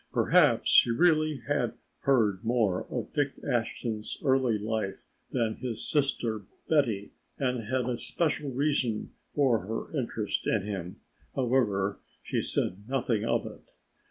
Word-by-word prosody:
Perhaps - - +4
she - - +7
really 155 0 +3
had 145 0 0 0.2
heard 110 -9 +2
more 110 -6 +1
of - - -4
Dick 145 -2 +1
Ashton's 115 -3 -2
early 130 -4 +3
life 105 -2 -3 0.2
than 115 -4 0
his 120 -3 -3
sister 115 -8 0 0.2
Betty 115 -10 +1 0.3
and 125 -4 -1
had 125 +1 0
a 125 -2 -1
special 150 -3 0
reason 130 -4 0 0.2
for 130 -6 +3
her 115 +8 -4
interest 115 -6 -2
in 105 -3 +2
him, 95 -4 -5 0.3
however 115 -7 +1 0.2
she - - -1
said 100 +5 -2
nothing 120 -5 0
of 115 - +1
it. - - -9
120 Hz, 130 wpm, -29 LUFS, 110-135 Hz, 0.3 s, she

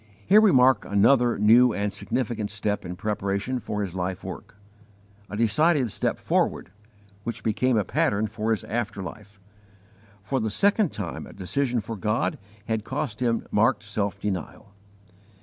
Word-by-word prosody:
Here 210 +4 +6
we 215 -3 +5
mark 130 0 +5
another 120 +4 +3
new 115 +3 +5
and 100 0 -2
significant 110 -4 -2
step 105 0 -2
in 90 0 -5
preparation 105 +4 -2
for 105 -3 -3
his 95 -4 -5
life 90 0 -3
work - - -8 0.7
a 105 - -5
decided 125 +3 +2
step - - -1
forward, 90 - -1 0.5
which 115 - -5
became 120 +3 +1
a 105 - +2
pattern 105 +4 +1
for 110 +1 -3
his 110 -4 0
after 110 -3 -3
life. 100 +2 -10 0.8
For 130 +6 -1
the 110 -2 -1
second 200 - +2
time 100 -5 -6
a - - -12
_decision 120 +4 -1
for 115 - -5
God 110 - -1 0.3
had 110 -2 -2
cost 110 0 -4
him 115 -2 0
marked 105 +1 +2
self 100 -1 -3
denial. 100 0 -5
110 Hz, 155 wpm, -25 LUFS, 100-125 Hz, 0.8 s, Here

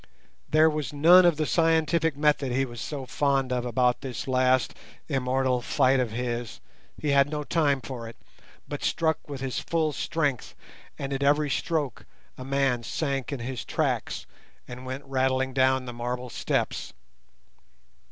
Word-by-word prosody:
There 155 +1 +5
was 150 -2 -1
none 175 +5 +7
of 170 -3 +2
the 155 - 0
scientific 160 -1 +2
method 145 -3 +2
he 135 +2 +1
was 120 -3 -8
so 140 -3 -5
fond 135 -1 0
of 125 -1 -1
about 125 0 +1
this 130 -2 -5
last 130 0 +2 0.3
immortal 130 -2 0
fight 130 +1 +2
of 125 -2 0
his; 120 0 -4 0.4
he 150 - -2
had 140 0 +4
no 150 0 -3
time 145 -4 +1
for 120 -4 -7
it, 115 - -12 0.5
but - - -5
struck 160 -1 +1
with 140 -2 -6
his 130 -2 -2
full 160 -2 0
strength, 145 -5 -2 0.4
and 140 0 -4
at 135 - -3
every 145 +1 +3
stroke 150 -4 -2 0.3
a 130 - -8
man 135 -2 +1
sank 135 +3 -2
in 140 -4 -4
his 125 0 -4
tracks, - - -2 0.4
and 125 +1 -9
went 130 +2 -5
rattling 130 -1 0
down 130 0 +2
the 120 - -6
marble 125 +1 -4
steps. - - -2
135 Hz, 160 wpm, -26 LUFS, 125-150 Hz, 0.5 s, none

